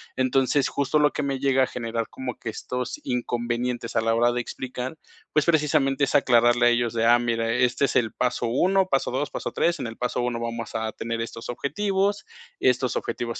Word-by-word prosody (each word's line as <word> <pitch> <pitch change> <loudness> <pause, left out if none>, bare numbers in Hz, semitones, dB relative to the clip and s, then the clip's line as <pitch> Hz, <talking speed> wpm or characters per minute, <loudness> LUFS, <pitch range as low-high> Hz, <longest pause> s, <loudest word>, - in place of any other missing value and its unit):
Entonces, 130 +2 +2
justo 140 +2 +1
lo 150 0 +4
que 150 - -3
me 135 -1 -2
llega 135 -1 +3
a - - +1
generar 115 -2 -3
como 130 -2 -6
que 115 - -6
estos 125 +3 -4
inconvenientes 120 -1 -2
a - - +3
la 115 0 +1
hora 120 +1 +3
de 120 - -1
explicar, 130 +4 -6 0.4
pues, 150 -1 +3
precisamente 145 -4 +2
es 135 - +1
aclararle 120 -2 +4
a - - +6
ellos 120 -1 +1
de: 115 0 +1
"Ah, 120 +1 +6
mira, 115 -1 -1
este 125 +2 +2
es - - -3
el 115 -3 +2
paso 125 -1 -1
1 185 +10 +2
paso 135 - +1
2 135 +3 -2
paso - - -4
3 170 -2 +1
en 120 - -3
el 115 - -8
paso 125 0 -2
1 120 -1 -1
vamos 115 0 -5
a 110 0 -2
tener 115 +1 -4
estos 115 0 -6
objetivos, 195 - -1 0.3
estos - - +2
objetivos, - - -4
125 Hz, 205 wpm, -25 LUFS, 115-140 Hz, 0.4 s, a